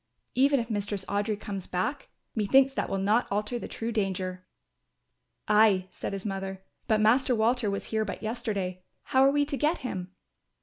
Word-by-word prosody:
Even 275 +2 +4
if 230 - -3
Mistress 205 -2 -2
Audry 205 +1 -1
comes 195 -3 -5
back, 250 +10 -2 0.2
methinks 265 +5 +4
that - - -2
will 195 - -1
not 210 +5 +2
alter 210 +4 -1
the - - -6
true 230 +1 -4
danger." 185 -4 -2 1.0
"Ay," 210 -3 +4
said - - -5
his 195 0 -5
mother, 195 -1 -4 0.2
"but 215 -1 +3
Master 245 +4 +4
Walter 230 0 +2
was 200 - -3
here 220 0 +2
but 215 - -6
yesterday, 210 -6 -3 0.2
how 260 - +2
are 270 - +6
we 290 +1 +2
to 285 0 -3
get 305 +6 +2
him?" 185 -6 -4
215 Hz, 175 wpm, -28 LUFS, 195-245 Hz, 1.0 s, are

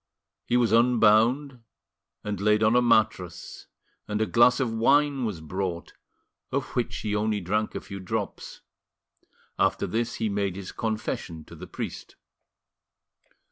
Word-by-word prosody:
He 120 - +2
was 120 -3 +2
unbound 120 +3 +3 0.6
and 105 -2 -4
laid 105 +1 +3
on 110 +2 +4
a 125 - +5
mattress, 105 -7 0 0.4
and 105 0 -2
a 110 - +2
glass 120 +2 +4
of 120 -4 -1
wine 135 +3 +3
was 100 -8 -4
brought, 90 +1 -4 0.6
of - - -2
which - - -1
he 105 -1 -2
only 105 0 0
drank 105 +4 -2
a - - -3
few 100 - -8
drops; 95 - -5 1.0
after - - +2
this, 115 +1 -2
he 110 - -1
made 100 -2 -1
his 100 -1 -7
confession 105 -7 -4
to - - -13
the - - -10
priest. - - -7
110 Hz, 140 wpm, -26 LUFS, 100-120 Hz, 1.0 s, a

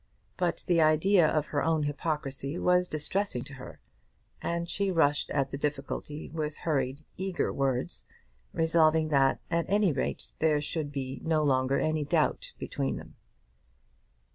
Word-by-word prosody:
But 175 -2 -1
the 170 -2 +3
idea 160 +3 +5
of 155 -1 +1
her 145 -2 -1
own 160 -2 +2
hypocrisy 145 -1 -3
was 180 0 +3
distressing 155 -2 -1
to 145 - -10
her, 130 -1 -10 0.6
and 170 0 -2
she 200 +2 0
rushed 150 -5 +2
at 135 -2 0
the 140 - -4
difficulty 145 +1 -3
with 155 -2 -3
hurried, 140 -1 -1
eager 190 -1 -1
words, 135 -2 -1 0.5
resolving 160 -1 +3
that, 135 -2 +3
at 170 0 +1
any 205 -2 +3
rate, 130 - -3
there 155 -2 +3
should 150 0 -3
be 135 -2 -5
no 160 -1 +2
longer 130 -1 +2
any 155 -1 0
doubt 145 - 0
between 70 -1 -2
them. - - -10
155 Hz, 145 wpm, -29 LUFS, 140-165 Hz, 0.6 s, idea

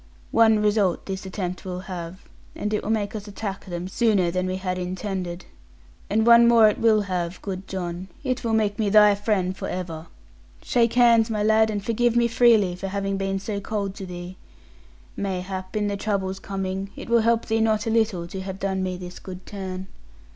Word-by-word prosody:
One 220 -1 +5
result 205 -4 +1
this 190 0 -5
attempt 185 -1 -4
will 180 -1 -5
have, 180 -1 -7 0.3
it 210 0 -1
will - - -4
make 215 -1 -1
us 210 0 -6
attack 200 -1 -5
them 175 -1 -5
sooner 195 -4 +2
than 185 +1 -1
we 185 - -2
had 185 -1 -3
intended. 185 -1 -4 0.6
And 220 +2 +2
one 235 0 +8
more 230 -2 +7
it 210 - -3
will 220 -2 +4
have, 180 -3 -3
good 190 -1 -5
John, 180 -1 -4 0.2
it 255 -2 -2
will 230 -1 0
make 210 -1 +1
me 210 -2 +1
thy 210 0 +7
friend 200 -3 0
for - - -5
ever. 170 -3 -5 0.6
Shake 235 -2 +2
hands 235 -2 +5
my 210 -2 -1
lad, 220 +1 +4
and 205 -2 -3
forgive 235 +1 +1
me 240 0 +4
freely 225 -6 +4
for 195 +2 -5
having 195 0 -2
been 195 0 -1
so 200 +1 -4
cold 200 -1 -3
to 195 -1 -8
thee. 180 +1 -8 0.8
Mayhap, 185 -1 -4
in 210 -1 +1
the 200 - -1
troubles 195 -2 -2
coming, 195 0 -4
it - - -8
will 235 -1 +4
help 230 0 +2
thee 225 0 0
not 220 0 +1
a 225 - 0
little 220 -6 +1
to 190 - -5
have 190 0 -6
done 190 -1 -1
me 185 -1 -2
this 180 0 -9
good 185 -1 -9
turn.' 190 -2 -6
195 Hz, 195 wpm, -24 LUFS, 185-220 Hz, 0.8 s, one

